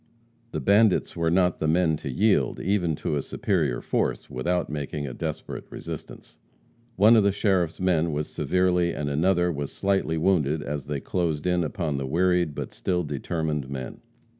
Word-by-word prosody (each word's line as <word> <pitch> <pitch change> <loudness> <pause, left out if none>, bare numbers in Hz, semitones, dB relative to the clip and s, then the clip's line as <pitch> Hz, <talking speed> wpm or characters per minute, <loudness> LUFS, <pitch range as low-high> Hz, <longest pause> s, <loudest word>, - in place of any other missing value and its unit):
The - - -3
bandits 100 -1 +3
were 85 -1 +1
not 90 0 +2
the 80 - 0
men 80 0 +3
to 70 - -6
yield, 100 - +2
even 90 -5 0
to 75 - -2
a - - 0
superior 75 -10 -1
force, - - -1
without 85 +7 -1
making 75 0 -4
a 65 - -5
desperate - - -5
resistance. - - -9 0.6
One 110 +4 +6
of 110 - +6
the 100 0 +3
sheriff's 95 -5 0
men 85 -3 +2
was 75 0 -2
severely 90 -2 +1
and 70 -1 -2
another 90 +4 +2
was 70 -3 -4
slightly 95 -5 0
wounded 80 -4 +1
as 70 -2 -4
they 75 -2 -3
closed 80 -5 -1
in 90 -1 +2
upon 75 -2 -2
the 70 -1 -3
wearied 90 0 +1
but - - -5
still 90 -1 -1
determined 75 -1 -3
men. 65 -2 -6
85 Hz, 170 wpm, -25 LUFS, 75-90 Hz, 0.6 s, One